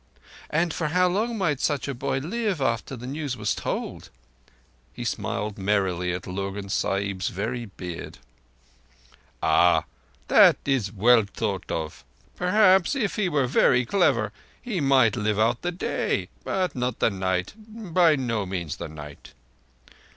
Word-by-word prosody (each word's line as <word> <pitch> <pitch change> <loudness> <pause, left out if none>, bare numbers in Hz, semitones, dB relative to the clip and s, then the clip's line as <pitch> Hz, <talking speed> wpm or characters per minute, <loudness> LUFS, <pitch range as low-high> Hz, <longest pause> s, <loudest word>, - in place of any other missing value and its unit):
And 165 +1 +1
for 165 - -1
how 180 +4 +3
long 220 +6 -1
might 160 -9 0
such 145 -3 0
a 140 - -2
boy 135 +2 -2
live 195 - -2
after 115 0 -1
the 125 0 -9
news 140 -1 -4
was 105 - 0
told?" - - -4 0.8
He - - -6
smiled 105 -1 -3
merrily 95 -3 0
at 90 0 -4
Lurgan's 100 +1 -4
Sahib's 100 -1 -1
very 115 +5 -3
beard. 90 -4 -8 1.3
"Ah! - - +4 0.4
That - - +7
is 135 -7 +1
to 100 - -13
be 95 - -13
well 120 -1 +6
thought 100 -4 -3
of. 80 -4 -4 0.3
Perhaps 185 +2 +4
if 225 -7 -1
he 200 -4 0
were 145 -5 +1
very 125 -1 +3
clever, 120 - +2 0.3
he 220 -9 -3
might 130 -6 +4
live 105 -2 0
out 115 +2 +2
the 175 - -1
day—but 180 0 -2
not 125 -1 -2
the - - +2
night. 95 -1 -1
By 180 -7 +2
no 115 -7 -2
means 90 -5 -4
the - - -6
night." 75 -2 -11
125 Hz, 150 wpm, -25 LUFS, 100-165 Hz, 1.3 s, That